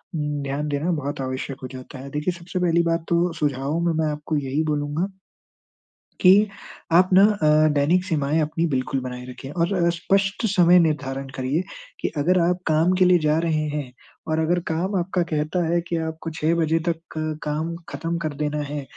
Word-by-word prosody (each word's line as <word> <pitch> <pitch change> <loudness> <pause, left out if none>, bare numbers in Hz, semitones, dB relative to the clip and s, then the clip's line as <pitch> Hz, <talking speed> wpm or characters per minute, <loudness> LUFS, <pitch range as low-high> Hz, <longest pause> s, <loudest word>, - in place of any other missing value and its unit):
उम, 150 -2 -2
ध्यान 140 +2 -2
देना 145 +5 -1
बहुत 145 -3 -3
आवश्यक 130 +1 -4
हो - - -3
जाता 130 +1 -9
है। 140 +1 -8
देखिए, 150 +4 -1
सबसे 180 +2 -4
पहली 170 -1 +3
बात 165 0 0
तो 170 +1 +2
सुझाव 145 +1 -1
में 170 - +2
मैं 160 -1 0
आपको 150 +1 -3
यही 140 +2 -1
बोलूँगा 150 +3 -1 1.1
कि 185 - +7 0.6
आप 180 +2 +6
ना 190 +2 +7
अ, 155 -7 +4
दैनिक 165 +6 +2
सीमाएँ 155 -3 0
अपनी 155 +2 0
बिल्कुल 135 -1 -1
बनाए 125 -1 -6
रखिए 130 +2 -9
और 170 +1 +1
स्पष्ट 195 +5 0
समय 180 -3 +5
निर्धारण 135 -4 -1
करिए 135 +7 0 0.4
कि - - 0
अगर 180 +6 +3
आप 175 +1 +2
काम 160 +3 +3
के 185 - +5
लिए 180 0 +5
जा 155 -1 +2
रहे 160 -2 0
हैं, 145 -4 -4 0.4
और 155 0 0
अगर 175 +2 +1
काम 175 +5 -1
आपका 180 0 0
कहता 160 +2 -1
है 170 +1 +2
कि 170 - -1
आपको 160 0 -4
6 160 +1 0
बजे 160 +1 +2
तक 165 -1 -1 0.2
क 155 -1 -2
काम 155 +3 -2
खत्म 165 +1 -3
कर 155 -3 -3
देना 150 0 -1
है, 145 0 -4
155 Hz, 190 wpm, -23 LUFS, 145-170 Hz, 1.1 s, कि